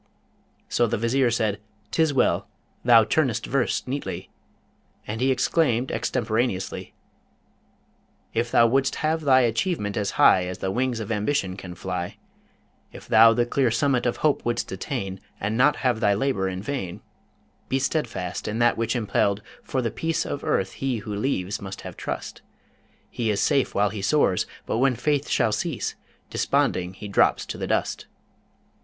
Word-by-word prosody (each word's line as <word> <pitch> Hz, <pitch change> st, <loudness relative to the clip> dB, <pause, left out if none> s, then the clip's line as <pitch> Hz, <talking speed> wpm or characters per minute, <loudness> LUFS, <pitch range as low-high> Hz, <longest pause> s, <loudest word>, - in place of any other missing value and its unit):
So 120 Hz, -, +2 dB
the 115 Hz, -, -1 dB
Vizier 120 Hz, +3 st, +2 dB
said, 110 Hz, -3 st, 0 dB, 0.3 s
''Tis 160 Hz, -2 st, +2 dB
well, 135 Hz, -, +1 dB, 0.4 s
thou 115 Hz, -2 st, +7 dB
turnest 130 Hz, -1 st, +1 dB
verse 135 Hz, -2 st, 0 dB
neatly' 125 Hz, -9 st, -5 dB, 0.7 s
And 110 Hz, +2 st, -4 dB
he 130 Hz, -, +3 dB
exclaimed 130 Hz, -1 st, +1 dB
extemporaneously: 115 Hz, -4 st, -2 dB, 1.4 s
If 115 Hz, +1 st, 0 dB
thou 115 Hz, -, +5 dB
wouldst 135 Hz, +3 st, +2 dB
have 160 Hz, +1 st, +1 dB
thy 135 Hz, -3 st, +5 dB
achievement 115 Hz, -, 0 dB
as 105 Hz, -2 st, -1 dB
high 90 Hz, -1 st, +5 dB
As 90 Hz, -, -5 dB
the 95 Hz, -, -2 dB
wings 125 Hz, +1 st, 0 dB
of 110 Hz, 0 st, -5 dB
Ambition 105 Hz, -3 st, 0 dB
can 90 Hz, -2 st, -9 dB
fly: 90 Hz, 0 st, -4 dB, 0.7 s
If -, -, -12 dB
thou 115 Hz, +1 st, +7 dB
the 120 Hz, -, +2 dB
clear 130 Hz, +1 st, +1 dB
summit 125 Hz, +1 st, +1 dB
of 120 Hz, -, -1 dB
hope 150 Hz, -, +2 dB
wouldst 120 Hz, 0 st, -2 dB
attain, 95 Hz, -2 st, -4 dB, 0.2 s
And 105 Hz, +2 st, -1 dB
not 140 Hz, +5 st, +4 dB
have 125 Hz, -3 st, +2 dB
thy 100 Hz, -2 st, +3 dB
labour 100 Hz, -5 st, 0 dB
in 95 Hz, +1 st, -5 dB
vain; 105 Hz, -10 st, -4 dB, 0.7 s
Be 135 Hz, -, +2 dB
steadfast 130 Hz, -, -2 dB
in 105 Hz, -, -2 dB
that 120 Hz, 0 st, +3 dB
which 115 Hz, +1 st, -1 dB
impell'd, 105 Hz, -3 st, +1 dB, 0.2 s
for 130 Hz, -2 st, -2 dB
the 115 Hz, -, -1 dB
peace 165 Hz, 0 st, -1 dB
Of 145 Hz, -, -4 dB
earth 95 Hz, -, 0 dB
he 135 Hz, -3 st, -2 dB
who 105 Hz, -, -4 dB
leaves 100 Hz, -4 st, -2 dB
must 95 Hz, -1 st, -7 dB
have -, -, -8 dB
trust: -, -, -5 dB, 0.7 s
He 115 Hz, -2 st, -1 dB
is 105 Hz, -, +1 dB
safe 140 Hz, -3 st, +1 dB
while 105 Hz, 0 st, +2 dB
he 105 Hz, -2 st, -5 dB
soars, 100 Hz, -5 st, +2 dB, 0.2 s
but 110 Hz, -, -1 dB
when 130 Hz, 0 st, +3 dB
faith 145 Hz, +3 st, 0 dB
shall 110 Hz, -, +2 dB
cease, 150 Hz, +5 st, -2 dB, 0.4 s
Desponding 90 Hz, +1 st, 0 dB
he 105 Hz, -, -8 dB
drops 100 Hz, -, +2 dB
to -, -, -6 dB
the -, -, -3 dB
dust. -, -, -1 dB
115 Hz, 165 wpm, -25 LUFS, 100-135 Hz, 1.4 s, thou